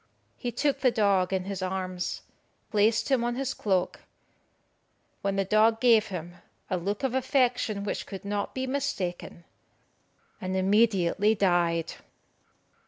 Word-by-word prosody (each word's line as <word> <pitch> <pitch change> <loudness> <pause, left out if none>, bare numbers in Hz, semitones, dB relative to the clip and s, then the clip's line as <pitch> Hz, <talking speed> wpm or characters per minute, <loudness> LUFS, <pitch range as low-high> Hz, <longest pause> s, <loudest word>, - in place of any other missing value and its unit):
He 245 - -4
took 285 +3 0
the 255 - +4
dog 200 -5 +2
in 190 -1 0
his 195 0 -5
arms, 185 -1 -3 0.5
placed 220 +3 +2
him 255 -3 +3
on 240 0 -1
his 270 +1 -2
cloak, 190 -4 -1 1.2
when 195 0 -1
the 195 0 0
dog 220 +3 +3
gave 230 -3 +5
him 175 -2 -7 0.3
a 185 - +1
look 200 +7 -3
of 265 -2 0
affection 250 -5 +1
which 205 - -4
could 195 -1 -8
not 205 0 -3
be 260 0 -2
mistaken, 200 -11 -3 1.0
and 185 0 -3
immediately 205 0 +3
died. 175 -4 +1
200 Hz, 135 wpm, -27 LUFS, 185-235 Hz, 1.2 s, gave